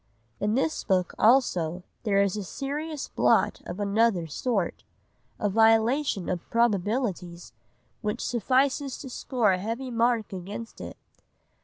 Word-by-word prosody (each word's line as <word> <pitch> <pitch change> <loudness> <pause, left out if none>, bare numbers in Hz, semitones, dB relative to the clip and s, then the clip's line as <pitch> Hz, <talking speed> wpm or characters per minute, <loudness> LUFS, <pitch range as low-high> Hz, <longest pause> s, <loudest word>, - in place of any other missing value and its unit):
'" 115 +1 -41
In 210 +2 0
this 290 +4 0
book 185 -3 +1
also 185 -8 +3 0.2
there 200 -2 +3
is 200 -1 0
a 210 - -3
serious 290 - -4
blot - - +2
of 180 - -6
another 205 -3 +2
sort, 195 - -2 0.6
a 210 - +1
violation 225 - +3
of 180 -2 -4
probabilities, 200 - -1 0.5
which 210 +3 -2
suffices 260 +4 +1
to 265 - -8
score 240 -4 +1
a 185 - 0
heavy 230 +6 -4
mark 230 -2 +1
against 200 +5 -7
it. - - -8
220 Hz, 135 wpm, -27 LUFS, 190-250 Hz, 0.6 s, also